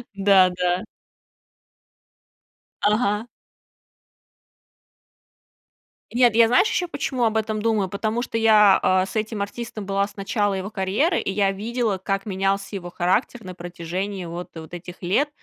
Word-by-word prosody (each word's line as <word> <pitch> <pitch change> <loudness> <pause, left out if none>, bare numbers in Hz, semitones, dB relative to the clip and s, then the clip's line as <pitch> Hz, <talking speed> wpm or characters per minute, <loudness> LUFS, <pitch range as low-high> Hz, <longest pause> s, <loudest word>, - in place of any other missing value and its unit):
Да, 195 -2 +5
да. 180 +2 -1 2.0
Ага. 210 +1 +1 2.8
Нет, 240 -2 +4
я 230 -1 +6
знаешь, 250 - +4
ещё 355 - -1
почему 260 -5 -2
об 220 -1 +2
этом 215 -1 -2
думаю? 215 -4 +1
Потому 215 +5 -2
что 230 - -3
я, 215 -3 +6
а, 185 0 +3
с 195 - -10
этим 215 -1 -1
артистом 230 0 -7
была 200 +1 0
с - - -17
начала 205 0 -1
его 190 +2 -5
карьеры, 210 - +1
и - - -2
я 195 0 +2
видела, 220 0 -2
как 195 +1 -2
менялся 195 +1 -1
его 175 -2 -6
характер 190 +6 0
на 185 -1 -7
протяжении 175 +2 -5
вот 170 +1 -6
вот 160 +1 -10
этих 175 +1 -9
лет 265 +12 +1
200 Hz, 140 wpm, -23 LUFS, 185-225 Hz, 2.8 s, я